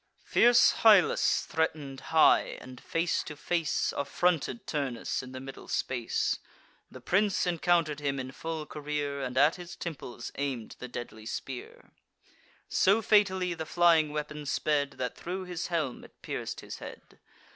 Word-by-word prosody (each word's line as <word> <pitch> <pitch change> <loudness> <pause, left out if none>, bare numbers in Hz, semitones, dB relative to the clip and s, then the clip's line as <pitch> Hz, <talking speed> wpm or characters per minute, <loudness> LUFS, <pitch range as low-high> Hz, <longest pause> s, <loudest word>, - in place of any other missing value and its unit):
Fierce 240 0 +5
Hyllus 210 -5 +5
threaten'd 150 -4 -2
high, 160 -1 +4
and, 130 -1 -11
face 165 +1 0
to 150 - -8
face, 165 +1 0
Affronted 140 -4 0
Turnus 135 -5 -2
in 125 - -10
the 130 - -7
middle 135 +1 -9
space: 120 -3 -1 0.5
The - - -11
prince 200 +1 +1
encounter'd 170 -3 +1
him 140 -2 -1
in 130 0 -5
full 160 +1 -5
career, 145 -1 -3
And 130 -1 -4
at 145 +6 +5
his 175 -1 -9
temples 130 -7 -6
aim'd 130 -6 -3
the 125 - -6
deadly 120 -3 -7
spear; 130 +1 -7 0.8
So 200 +4 +3
fatally 190 -4 +3
the 160 -2 -6
flying 165 -2 +4
weapon 150 0 -5
sped, 145 0 0
That 125 -2 -4
thro' 185 +2 -5
his 180 -1 -4
brazen - - -15
helm 155 -7 -2
it - - -19
pierc'd - - -4
his - - -8
head. - - -11
150 Hz, 150 wpm, -29 LUFS, 135-175 Hz, 0.8 s, Fierce